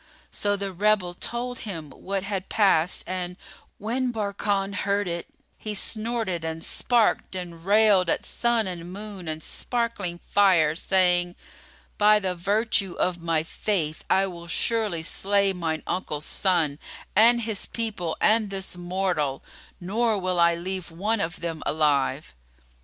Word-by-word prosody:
So 205 0 +1
the 200 -1 -4
rebel 195 -1 +2
told 240 +6 -4
him 165 -9 -6
what 195 +6 -3
had 195 -1 -3
passed 185 -5 +3
and, 180 -1 -4 0.4
when 245 +4 -1
Barkan 200 -2 -1
heard 200 0 0
it, 170 -1 -3 0.3
he 215 -1 -4
snorted 215 -4 0
and 160 0 -4
snarked 235 -5 +1
and 170 -3 -6
railed 200 -2 +4
at - - 0
Sun 235 -2 +1
and 175 -1 -6
Moon 200 -2 -7
and 155 0 -4
sparkling 230 -8 -2
Fire, 175 -5 +3
saying, 180 -1 +2 0.6
"By 210 0 +6
the 190 -3 -1
virtue 200 +1 +1
of 175 -1 -1
my 165 -2 +1
faith, 165 -3 -2
I 190 +1 +4
will 170 -2 -8
surely 210 -2 0
slay 200 +3 +2
mine 160 -4 -3
uncle's 150 -5 -3
son 165 -7 +1 0.4
and 235 +3 +6
his 220 -2 -2
people 205 -8 -3
and 215 -1 +3
this 195 -2 -5
mortal, 175 -6 -1 0.4
nor 220 +4 +1
will 185 -2 -1
I 170 0 +5
leave 185 +1 -4
one 200 +6 -1
of 170 +2 -4
them 165 -2 -4
alive!" 150 -2 +1
190 Hz, 140 wpm, -25 LUFS, 170-210 Hz, 0.6 s, By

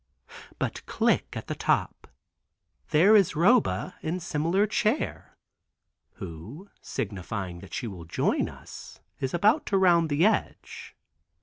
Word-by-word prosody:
But - - -3
"click" - - 0
at - - -6
the - - -4
top. - - -1 0.8
There 185 +8 +5
is 195 -6 +4
Roba 190 +2 +2
in 170 +4 -2
similar 170 +4 +1
chair, 215 +5 -2 0.8
who 100 - -10
signifying 95 -3 -5
that 95 +1 -9
she 125 - -3
will 95 -7 -7
join 80 - 0
us - - -12 0.2
is 130 - -2
about 215 - +3
to 195 - +2
round 170 -4 +4
the 150 +5 +3
edge. 220 - -2
165 Hz, 125 wpm, -27 LUFS, -, 0.8 s, There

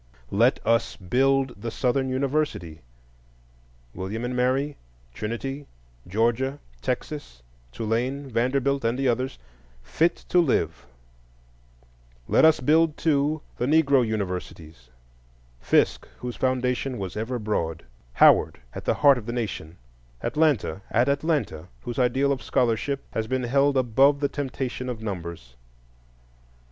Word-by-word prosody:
Let 115 +6 +3
us 115 0 +2
build 130 +3 +1
the 115 - -3
Southern 130 +3 0
university—William - - -5
and 125 +1 -3
Mary, 130 +4 +1 0.4
Trinity, 135 - -5 0.4
Georgia, 120 +7 0 0.2
Texas, - - -4 0.3
Tulane, 120 - -2
Vanderbilt, 130 +3 0
and 115 +2 0
the 135 0 0
others—fit 60 - -2
to 180 - +4
live; 160 -8 0 1.4
let - - +5
us 160 -3 +5
build, 155 +3 +3
too, 150 -1 +1
the 125 - -1
Negro 140 -3 +4
universities:—Fisk, 60 - -3
whose 125 -1 -6
foundation 130 0 0
was 95 -3 -5
ever 115 +4 -2
broad; 105 -7 -2 0.3
Howard, - - +5
at - - -7
the - - +2
heart 140 -3 +7
of 110 - -11
the - - -2
Nation; 100 -8 -4 0.5
Atlanta 145 - +1
at 120 +4 +2
Atlanta, 140 - -1
whose 120 0 -5
ideal 130 +3 +2
of 135 - -1
scholarship 125 +3 0
has 110 -1 -2
been 130 +1 -1
held 140 +3 +2
above 135 +3 +4
the 140 -1 0
temptation 130 -2 -4
of 115 -3 -5
numbers. 85 - -6
120 Hz, 115 wpm, -25 LUFS, 85-135 Hz, 1.4 s, heart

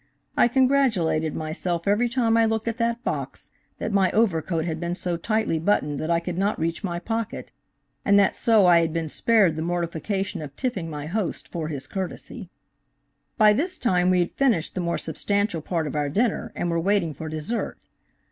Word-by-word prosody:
I - - +5
congratulated 240 - +2
myself 170 +2 -3
every 215 +4 +3
time 235 -2 +2
I 230 0 +5
looked 220 0 -1
at 230 0 -2
that 235 +1 0
box - - -4 0.3
that - - -3
my 195 -2 +4
overcoat 170 -6 +1
had 160 -2 -3
been 170 +1 -2
so 180 -2 -2
tightly 215 -1 0
buttoned 150 -5 +1
that 155 - -3
I 170 0 +3
could 175 +1 -4
not 200 +2 +1
reach 165 +5 -2
my 175 -3 -2
pocket, 225 +5 -4 0.5
and 200 0 +4
that 200 -1 +4
so 220 -4 +4
I 175 -1 +7
had 165 -1 0
been 165 -2 -2
spared 205 -3 +3
the 160 - -3
mortificatlon 175 +3 -2
of 140 -2 -9
tipping 195 - -3
my 150 -2 -5
host 190 +3 -3
for 165 -3 -4
his 145 -4 -5
courtesy." 190 -3 -6 0.9
By 215 -1 +6
this 350 - -1
time 180 -6 +2
we 180 -1 +4
had 175 - -1
finished 240 - +1
the 185 - -2
more 170 -1 -1
substantial 200 +2 -1
part 165 0 -2
of 150 - -4
our 145 -1 0
dinner, 215 - 0
and 175 - -1
were 170 - +1
waiting 180 -2 +1
for 160 +3 -7
dessert. 155 +10 -3
180 Hz, 195 wpm, -24 LUFS, 165-220 Hz, 0.9 s, I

